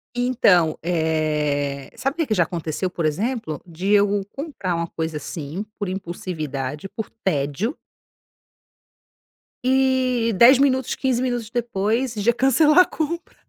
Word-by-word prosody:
Então, 205 -10 +3
eh, 150 -4 -1
sabe 270 +3 -2
o - - -31
que 325 - 0
que 215 - +1
já 175 -4 +4
aconteceu 170 +1 -3
por 170 -2 -3
exemplo, 175 - -2
de 180 +4 -3
eu 205 -1 +3
comprar 275 - -3
uma 170 0 -2
coisa 160 -1 -4
assim 150 +6 -5
por 205 - -2
impulsividade, 155 -5 -5
por 220 +1 -6
tédio 150 - -1 1.9
e 255 -3 +2
10, 245 +5 +8
minutos 265 -2 +2
15 255 -2 0
minutos 240 -3 -2
depois, 235 +1 -1
já 220 +3 +2
cancelar 295 +6 +4
a 365 - +8
compra, 330 +2 -4
200 Hz, 135 wpm, -22 LUFS, 160-255 Hz, 1.9 s, 10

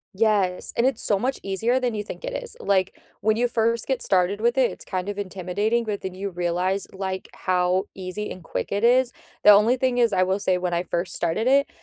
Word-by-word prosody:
Yes, 200 -4 +1
and 235 - +2
it's 265 -3 +1
so 205 - +1
much 255 +6 -2
easier 225 +6 0
than 250 -2 -1
you 210 -1 -3
think 215 - -8
it - - -4
is, 485 0 -11
like, 190 - 0 0.2
when 220 +1 +2
you 245 +1 +2
first 230 -1 0
get 265 -2 -1
started 190 +2 +1
with 235 +2 +2
it, 255 -2 +4
it's - - -10
kind 185 -1 -4
of 205 -1 -4
intimidating, 205 +4 -1
but 210 -2 -3
then 190 - -5
you 195 +2 -4
realize, 180 +2 -1
like, 190 -1 -5
how 185 +1 +1
easy 190 +2 -5
and 185 - -8
quick 165 - -4
it 200 +2 -1
is, 250 +1 +4 0.3
the 210 - +9
only 215 +5 +5
thing 255 -1 +1
is- 235 -2 +4
I 185 - +3
will 190 +2 0
say- 185 -2 +1
when 180 -1 -2
I 170 +1 0
first 175 0 -3
started 175 +8 -1
it, 280 +2 +4
205 Hz, 235 wpm, -24 LUFS, 185-235 Hz, 0.3 s, the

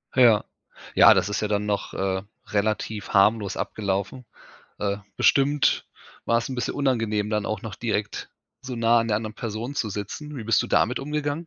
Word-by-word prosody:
Ja. 120 -5 +5 0.5
Ja, - - +9
das - - +1
ist 105 - -2
ja 105 - 0
dann 105 0 0
noch, 100 -1 -2
äh, 95 0 -1 0.3
relativ 105 0 -1
harmlos 100 0 +3
abgelaufen. 100 +4 -3 0.5
Äh, 100 0 -1 0.2
bestimmt 145 +1 +3 0.4
war 115 - +3
es 115 - -4
'n 130 - -4
bisschen 125 -2 -2
unangenehm, 115 -6 0
dann 105 -1 -1
auch 110 -2 -3
noch 110 -4 -6
direkt 105 -2 -3 0.3
so 130 -1 -6
nah 115 0 +4
an 115 - -2
der 105 - +2
anderen 110 0 -5
Person 115 +5 -5
zu 110 -6 -1
sitzen. 140 +9 -6
Wie 115 - -6
bist 115 -1 +3
du - - -5
damit 125 - +2
umgegangen? 150 +3 -3
110 Hz, 185 wpm, -25 LUFS, 105-125 Hz, 0.5 s, Ja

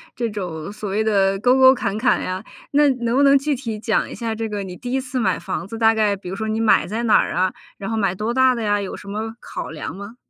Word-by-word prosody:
这 240 - -1
种 180 -4 -5
所 210 -1 -6
谓 210 +3 0
的 195 -2 +2
沟 250 +4 +4
沟 260 0 +8
坎 215 -6 -2
坎 245 +3 +2
呀。 185 +2 -4 0.3
那 290 0 +4
能 240 -2 -1
不 280 - +4
能 280 0 +6
具 285 +1 0
体 230 -5 -5
讲 215 0 0
一 - - -8
下 230 -2 -3
这 225 0 -3
个 205 -1 -3
你 185 -2 -7
第 245 +6 -7
1 265 - +1
次 255 0 -4
买 190 -6 +1
房 175 +1 -4
子， 225 - -7
大 225 0 +4
概 215 -2 +2
比 195 -2 -11
如 190 - -4
说 220 +2 -3
你 220 +1 -1
买 225 -5 +3
在 225 +5 -3
哪 225 - +5
儿 - - -1
啊？ 185 +1 +1 0.2
然 195 - -5
后 225 - -1
买 195 -4 +1
多 215 +4 -2
大 260 0 +4
的 235 - -4
呀？ 205 -1 +1
有 195 - -5
什 - - -13
么 220 +3 -4
考 - - -6
量 155 +1 -6
吗？ 200 +4 -9
220 Hz, 295 characters per minute, -21 LUFS, 200-240 Hz, 0.3 s, 沟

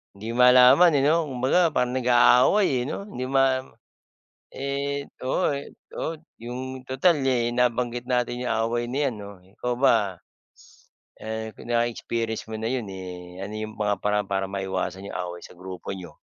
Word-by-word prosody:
Hindi 105 +3 -8
malaman, 125 +7 +7
eh, - - +3
'no 160 0 +2
kumbaga 135 +7 +2
parang 125 -4 0
nag-aaway, 125 - +4
eh, - - -1
'no 200 - -5
hindi 130 -11 -5
ma 135 -1 +3 0.9
Eh, 140 +1 -3 0.2
oo, 165 +6 +1 0.5
oo 165 - -2 0.2
yung 130 +2 -7
total, 145 +5 +3
eh, 120 -2 +1
nabanggit 120 0 0
natin 125 -1 0
'yong 115 - +1
away 120 +1 -1
nayan 130 -3 -1
'no 100 -2 -11
ikaw 120 +6 -4
ba, 115 -7 +3 1.0
eh, 110 0 -5
kung - - -12
na-experience 115 -1 -1
mo 110 0 -6
na 110 - -1
'yun, 125 -3 -2
eh, 90 -1 -8
ano 100 +2 -6
yung 110 0 -5
mga 105 -1 +1
paraan 105 -1 +1
para 95 0 0
maiwasan 95 0 -4
yung - - -5
away 90 -1 -5
sa - - -13
grupo 90 +1 -9
niyo? 90 -2 -11
120 Hz, 160 wpm, -25 LUFS, 105-130 Hz, 1.0 s, malaman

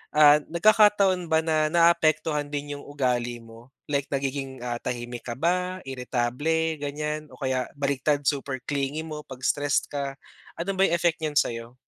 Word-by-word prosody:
ah, 150 0 +8
nagkakataon 195 -1 +4
ba, 160 0 +3
na 155 -1 +2
naapektuhan 155 -3 +3
din 145 0 -4
yung - - -11
ugali 125 -4 -1
mo? 115 +2 -15 0.2
Like 140 -1 -1
nagiging, 135 -1 -3
ah, 120 -1 -2
tahimik 120 0 -5
ka - - -1
ba, 180 +4 0
irritable 135 +5 -1
ganyan 150 +1 -3
o - - -13
kaya 130 -2 -1
baligtad 140 +1 0
super 140 -1 0
clingy 145 +2 -2
mo 155 -1 -6
pag 130 -1 -10
stressed 145 -1 +1
ka, 140 -1 -3 0.4
ano 175 - -3
ba 195 - +5
yung 170 - +2
effect 170 -1 +1
niyan 150 -2 -1
sayo? 115 +1 -1
145 Hz, 160 wpm, -26 LUFS, 130-160 Hz, 0.4 s, ah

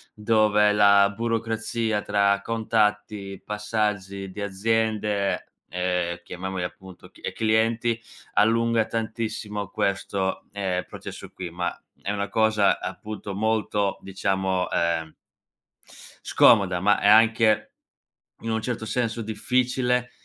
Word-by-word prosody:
dove 105 -1 +3
la 100 -1 +5
burocrazia 115 -1 -1
tra 100 -1 +2
contatti, 105 -3 -1
passaggi 105 -2 -2
di 105 - -7
aziende, 105 0 0 0.2
ehm, 90 -1 -1
chiamiamoli 95 +1 -5
appunto 95 +1 -9
c - - -20
ehm, - - -4
clienti, 115 +1 +1 0.3
allunga 115 +1 +3
tantissimo 110 -3 -3
questo, 100 -1 -1
ehm, 95 -3 -2
processo - - -9
qui. 90 -2 -7
Ma, 90 +1 -3 0.2
è 100 - -2
una 100 0 -2
cosa, 110 -3 +3
appunto, 105 -2 -6
molto, 105 -2 0
diciamo, 95 -1 -1
ehm 80 -2 0 1.1
scomoda, 95 -3 +5
ma 105 +2 +3
è - - +2
anche, 110 0 +5 0.7
in 115 - -3
un 110 0 0
certo 110 -1 -3
senso 115 +1 -1
difficile 125 +2 0
105 Hz, 110 wpm, -25 LUFS, 95-110 Hz, 1.1 s, la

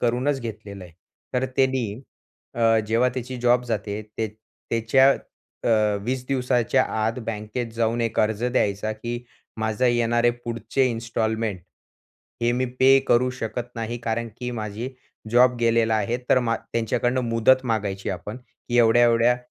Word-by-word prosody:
करूनच 125 +4 +1
घेतलेलं 105 -4 -7
आहे 85 - -14 0.4
तर 125 +1 +1
त्यांनी 130 -5 +1 0.6
अ, 115 -1 +3
जेव्हा 115 +3 +2
त्याची 125 +1 -5
जॉब 125 0 +3
जाते, 105 -3 -3
ते 110 +1 -4 0.4
त्याच्या 115 +4 +4 0.6
अ, 105 -2 +3
20 125 +2 -2
दिवसाच्या 130 -1 +2 0.2
आत 115 +3 -1
बँकेत 110 +2 -3
जाऊन 115 +1 +1
एक 115 -1 -1
अर्ज 110 +1 0
द्यायचा, 110 -4 0
की 120 +2 -6 0.3
माझं 110 +3 0
येणारे 120 0 +3
पुढचे 120 +3 -1
इन्स्टॉलमेंट, 110 -3 -2 0.8
हे 120 - +3
मी 125 +1 0 0.2
पे 135 +1 +7
करू 125 +2 +4
शकत 120 +1 -4
नाही. 115 +1 -3
कारण 115 +1 -1
की 125 0 -3
माझी 110 +1 -4 0.4
जॉब 125 +1 +5
गेलेला 115 -1 +3
आहे. 115 +2 0
तर - - +6
मा 115 -2 0
त्यांच्याकडनं 120 +2 -1
मुदत 115 +3 +3
मागायची 100 -5 -2
आपण, 100 +5 -6
की 125 -1 -5
एवढ्या-एवढ्या 120 +1 +5
115 Hz, 140 wpm, -24 LUFS, 110-125 Hz, 0.8 s, पे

